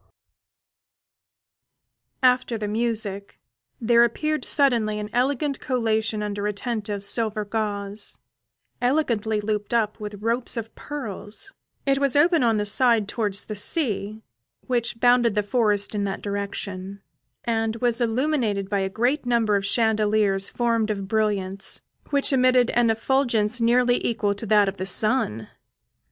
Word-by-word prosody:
After 250 -2 +3
the 210 -1 -4
music, 215 -3 -2 0.4
there 235 0 +4
appeared 305 +5 -1
suddenly 235 -7 +3
an 210 0 -5
elegant 275 +3 0
collation 220 -3 -1
under 205 0 -3
a 210 - -1
tent 215 0 -4
of 200 -1 -2
silver 215 0 0
gauze, 205 -1 -3 0.6
elegantly 235 -5 +1
looped 210 +1 -2
up 220 -1 0
with 210 -1 -7
ropes 235 +2 -1
of 225 -1 -5
pearls; 270 - -7 0.3
it 275 0 +2
was 275 -2 +2
open 330 +3 +4
on 230 -3 +2
the 210 - -1
side 230 0 +4
towards 205 -3 -2
the 215 - -6
sea, 215 - 0 0.4
which 240 -2 -2
bounded 245 -3 +4
the 210 - +1
forest 210 -2 0
in 205 -1 -1
that 195 -1 -4
direction; 200 -1 -5 0.4
and 225 -1 -1
was 240 +1 0
illuminated 230 -5 0
by 200 - +1
a 190 0 -1
great 245 +7 -1
number 230 -3 +2
of 200 0 0
chandeliers 210 -3 +2
formed 230 -2 0
of 200 -2 -3
brilliants, 200 -2 -1 0.3
which 280 -1 +1
emitted 255 -1 +3
an 240 -1 +2
effulgence 235 -1 +1
nearly 245 +1 +3
equal 210 -3 0
to 205 +2 -7
that 210 -1 +4
of 195 0 -3
the 185 - -4
sun. 195 - +1
220 Hz, 140 wpm, -24 LUFS, 205-245 Hz, 0.6 s, there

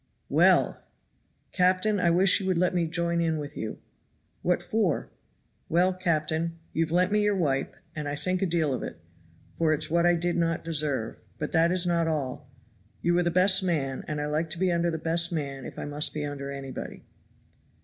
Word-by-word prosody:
"Well!" - - +3 0.7
"Captain, 185 +3 +2
I 175 - +3
wish 180 +4 +5
you 190 - -4
would 185 -2 +1
let 180 +1 +2
me 175 -2 +1
join 170 +1 0
in 160 -1 0
with 145 -1 -6
you!" 110 - -5 0.6
"What 175 0 0
for?" 195 -4 -1 0.6
"Well, 180 +3 +3
captain, 165 -2 -1 0.2
you've 160 0 0
lent 180 +3 +2
me 210 0 +3
your 210 -1 +2
wipe, 135 -6 -1 0.2
and 150 -2 -4
I 145 - -2
think 185 +5 -2
a 195 - +2
deal 160 -4 0
of 130 - -3
it, - - -6 0.6
for 155 -2 +2
it's 150 - -2
what 170 +1 +3
I 175 - +4
did 175 +1 -1
not 165 -1 0
deserve; 150 -8 -1 0.2
but 150 - -4
that 165 +1 +3
is 180 -1 +2
not 170 -1 +1
all. 145 -5 -3 0.5
You 175 0 +2
are - - +2
the 170 - +1
best 185 +2 +5
man, 140 -7 -1
and 150 -1 -3
I 150 - -2
like 155 +2 -1
to 160 - -4
be 185 -1 +2
under 170 0 +1
the 160 - -2
best 165 +2 +2
man 140 -5 -4
if - - -9
I - - -5
must 145 +1 -1
be 150 -1 -2
under 140 -1 -5
anybody." 135 -1 -7
165 Hz, 200 wpm, -27 LUFS, 150-180 Hz, 0.7 s, wish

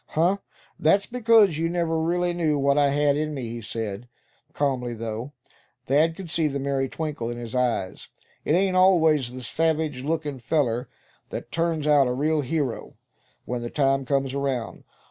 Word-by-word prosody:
"Huh! 175 +5 +2 0.4
that's 195 +6 +3
because 225 -8 +4
you 165 0 0
never 165 -2 0
really 175 +2 0
knew 160 -4 +1
what 140 0 +2
I 145 -1 +4
had 145 0 +2
in 155 0 -2
me," 135 - -4
he 120 0 -6
said, 110 +1 -5 0.4
calmly, 130 -5 -1
though 115 +4 -5 0.5
Thad 155 +5 +2
could 180 -3 -8
see 160 -2 +2
the 140 -1 -2
merry 135 -1 -1
twinkle 150 -7 -4
in 120 - -5
his 120 -2 -7
eyes; 120 -7 -1 0.4
"It - - +1
ain't 185 +1 +2
always 160 -8 +4
the 130 0 -8
savage 155 0 0
lookin' 150 -2 -2
feller 125 -2 0 0.4
that - - -7
turns 165 -2 -1
out 145 -3 +5
a 125 - 0
real 150 +4 +1
hero, 140 -3 -3 0.5
when 125 -1 -3
the 120 - -4
time 135 -1 +1
comes 135 0 0
around. 135 -5 -3
145 Hz, 170 wpm, -25 LUFS, 125-160 Hz, 0.5 s, out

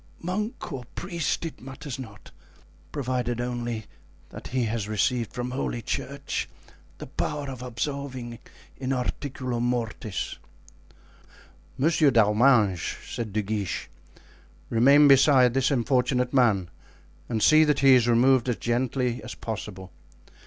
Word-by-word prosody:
Monk 210 - -3
or 130 -2 -5
priest, 170 -2 -2
it 165 - -7
matters 135 +1 -7
not, 110 -5 -10 0.6
provided 125 -4 -2
only 120 -2 -3 0.4
that - - -9
he 130 -1 -1
has 110 -2 -2
received 115 +2 0
from 125 0 -4
holy 125 -2 -2
church 135 +3 -4 0.5
the - - -8
power 145 -1 -3
of 130 -2 -7
absolving 125 -1 -4 0.4
in 130 0 -2
articulo 125 -1 -3
mortis." 115 -4 -2 1.4
"Monsieur 155 +1 +3
d'Arminges," 110 -4 +3 0.2
said 115 -4 -4
De 105 +1 -1
Guiche, 100 -2 -3 0.8
"remain 140 +6 +6
beside 135 -3 +6
this 135 0 +2
unfortunate 125 -1 +1
man 105 -10 +3 0.6
and 110 -3 0
see 155 0 +7
that 150 -3 +2
he 135 -1 +7
is 125 -2 +4
removed 125 +1 +4
as 120 - +1
gently 125 0 -1
as - - -7
possible. 95 -4 -6
125 Hz, 125 wpm, -26 LUFS, 115-135 Hz, 1.4 s, see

